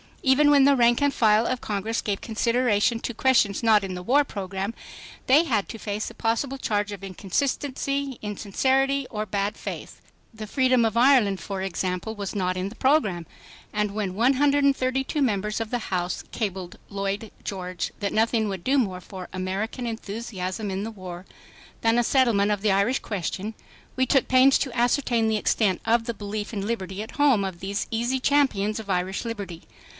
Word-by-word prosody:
Even 285 +2 +5
when 280 -2 +6
the 280 0 +5
rank 240 0 +4
and 285 -1 +2
file 220 0 +4
of 255 -1 -2
Congress 215 +2 -2
gave 200 -2 -2
consideration 230 -1 +1
to 240 - -4
questions 225 -4 +2
not 215 -3 +5
in 190 -1 -4
the 180 - -6
war 280 +9 +4
program, 195 -3 -4 0.5
they 285 +5 +6
had 225 - 0
to 225 - -7
face 210 0 -3
a - - -12
possible 240 +4 -1
charge 210 -5 -1
of 200 -2 -8
inconsistency, 275 - -2
insincerity 265 +7 0
or 215 -1 -3
bad 200 +1 -1
faith. - - -7 0.3
The 220 -1 -7
freedom 255 0 +3
of 225 0 -1
Ireland, 235 -7 +4
for 195 +2 -5
example, 185 +3 -3
was 200 -1 -5
not 185 -2 0
in 185 +2 -2
the 220 - -12
program. 215 - +2 0.5
And 210 -1 0
when 205 -3 -2
132 270 +2 +2
members 210 -4 0
of 225 -1 -3
the 245 -1 -3
House 180 -1 -1
cabled 190 -5 -4
Lloyd 200 +2 -3
George 180 -3 -4
that 200 -1 -2
nothing 225 0 +2
would 190 -3 -5
do 275 +2 +2
more 185 -7 -1
for 185 0 -9
American 195 +7 -3
enthusiasm 210 -3 -4
in 190 +1 -3
the 225 - -4
war 185 -3 -9 0.6
than 225 +1 +3
a - - +3
settlement 230 -6 +3
of 205 -2 -1
the 210 -1 +2
Irish 200 +7 +2
question, 200 +2 -4 0.4
we 260 - +2
took 270 -1 +3
pains 260 +1 +6
to 265 -4 -3
ascertain 240 -1 +2
the 220 -1 +1
extent 205 -3 +1
of 230 0 +2
the 235 - -2
belief 205 +1 -5
in 200 -2 -3
liberty 195 -3 -3
at 220 - -10
home 275 -8 +3
of 190 -3 -4
these 200 +2 -3
easy 240 +3 0
champions 250 -7 +2
of 215 -2 -9
Irish 185 +3 -1
liberty. 200 -7 -6
215 Hz, 180 wpm, -25 LUFS, 195-255 Hz, 0.6 s, when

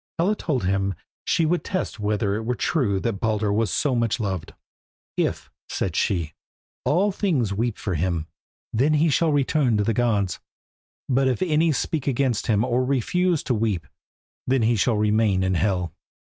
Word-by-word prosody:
Hela 185 +6 +2
told 145 - -2
him 95 0 0 0.3
she 165 - +2
would 170 +2 +1
test 185 - -3
whether 105 -1 0
it 110 +2 -2
were 125 +2 -1
true 115 - 0
that 115 -5 -2
Baldur 105 -2 0
was 110 0 +1
so 140 +6 +1
much 115 0 0
loved. 95 -6 -3 0.6
"If," - - -2 0.2
said 90 -4 -2
she, 85 -6 0 0.5
"all 180 +10 +2
things 150 - 0
weep 115 +2 -1
for 100 - -3
him, 85 -1 -1 0.5
then 140 +7 +3
he 155 +2 +3
shall 160 +2 +2
return 140 -4 +2
to 105 - +2
the 115 +2 +1
gods, 105 -5 0 0.7
but 135 0 +2
if 130 +8 +1
any 160 -1 +2
speak 145 0 -2
against 130 -4 0
him 110 0 +2
or 125 0 +1
refuse 155 +7 +1
to 125 - 0
weep, 105 -6 -1 0.6
then 130 -2 +2
he 115 +2 +3
shall 110 +1 +2
remain 105 -2 +2
in 95 0 +1
Hel." 90 -3 0
115 Hz, 170 wpm, -24 LUFS, 100-140 Hz, 0.7 s, then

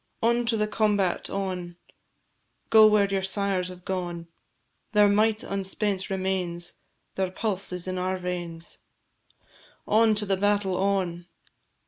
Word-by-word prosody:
On 235 +1 +2
to 225 -1 +2
the 210 - +1
combat, 210 -4 0
on! 180 -3 -4 1.0
Go 220 -1 +9
where 210 -1 +4
your 195 -1 -1
sires 190 -1 0
have 180 -1 -11
gone; 175 -3 -4 0.6
Their 210 -1 +6
might 215 +2 +2
unspent 195 0 -2
remains, 185 -3 -2 0.4
Their 190 -1 -1
pulse 195 0 -2
is 180 0 -3
in 185 0 -2
our 185 +1 -1
veins. 175 -2 -4 1.1
On 220 0 +4
to 210 0 0
the 195 -1 +1
battle, 205 -1 +1
on! 185 -3 -1
190 Hz, 130 wpm, -26 LUFS, 180-205 Hz, 1.1 s, Go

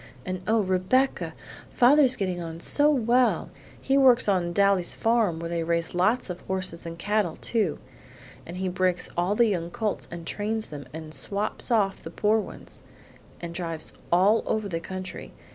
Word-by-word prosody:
And, 185 0 -4
oh! 220 +1 +3
Rebecca, 190 +8 +1 0.3
father's 260 +1 +5
getting 185 -4 -2
on 165 -1 -6
so 290 - +3
well! 250 -3 +2 0.3
He 270 +1 +2
works 255 -3 +5
on 180 -4 +1
Daly's 195 -2 +2
farm 225 -8 +1
where 165 0 -5
they 170 -1 -1
raise 170 0 -1
lots 210 +8 +1
of 180 - -8
horses 185 -3 -1
and 165 0 -7
cattle, 205 -2 0
too, 210 -10 -1 0.7
and 175 +2 -8
he 190 0 -2
breaks 180 0 0
all 180 +4 +1
the 235 - +5
young 175 -6 -1
colts 215 +1 -3
and 170 -1 -8
trains 215 +4 -2
them, 145 -3 -8
and 155 0 -8
swaps 205 +5 -1
off 205 -5 +1
the - - -8
poor 210 +5 +2
ones, - - -8 0.6
and 170 -1 -6
drives 165 -2 -5 0.2
all 195 +6 +4
over 215 -1 -1
the 165 -4 -3
country. 185 +2 -7
190 Hz, 170 wpm, -26 LUFS, 170-220 Hz, 0.7 s, father's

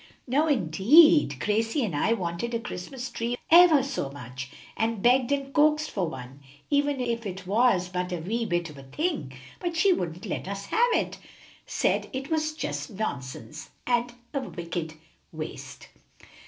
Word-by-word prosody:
"No, 285 +5 +2
indeed! 260 - +5
Gracie 225 - 0
and 180 -8 -3
I 220 +10 +2
wanted 190 +4 -3
a - - 0
Christmas 240 +5 -6
tree 240 +1 -2
ever 335 -5 +8
so 260 - -3
much, 130 -1 -8 0.3
and 225 -1 0
begged 250 +1 +4
and 275 -1 -1
coaxed 305 +1 +3
for 185 -5 -1
one, 130 0 -9 0.3
even 285 -1 +2
if 235 -2 -2
it 190 0 -7
was 200 -2 +3
but 180 0 -3
a 175 - -1
wee 220 +8 -2
bit 175 -3 -1
of 145 - -12
a - - -11
thing; 310 - -2 0.3
but 345 -2 -3
she 380 +3 +5
wouldn't 175 - -4
let - - -4
us 200 0 -5
have 480 - +2
it, - - -1 0.5
said - - 0
it 270 +3 -5
was 310 -1 0
just 310 - -4
nonsense 135 - -5 0.2
and 240 0 +1 0.2
a 280 - 0
wicked 170 -8 -5 0.4
waste." - - -8
230 Hz, 165 wpm, -27 LUFS, 175-275 Hz, 0.5 s, ever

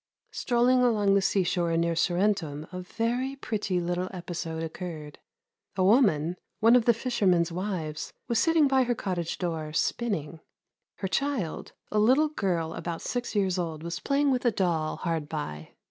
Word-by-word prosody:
Strolling 250 +1 +2
along 210 -5 +3
the 200 - +4
seashore 175 -3 +1
near 170 0 +1
Sorrentum 175 -4 0
a 180 0 -5
very 240 +7 -2
pretty 210 -8 -2
little 175 +1 -2
episode 170 -3 -5
occurred. 160 -3 -7 0.6
A 190 - +1
woman, 185 - +3 0.2
one 230 +2 +6
of 245 -2 +4
the 235 - +6
fishermen's 190 -9 +1
wives, 170 -4 -4 0.2
was 235 -1 +1
sitting 325 +1 +4
by 265 -1 +3
her 240 0 0
cottage 175 -6 -3
door, 160 -4 -3
spinning. 165 -6 -1 0.6
Her 195 - -3
child, 255 - -2 0.2
a 210 - +2
little 265 +8 +4
girl 175 - -1
about 170 -1 -5
six 245 -2 -3
years 190 -3 +1
old, 160 -3 -4
was 170 0 -4
playing 280 0 +1
with 250 -1 0
a 245 - +4
doll 170 -6 0
hard 165 -4 -2
by. 80 - -6
185 Hz, 160 wpm, -28 LUFS, 165-235 Hz, 0.6 s, one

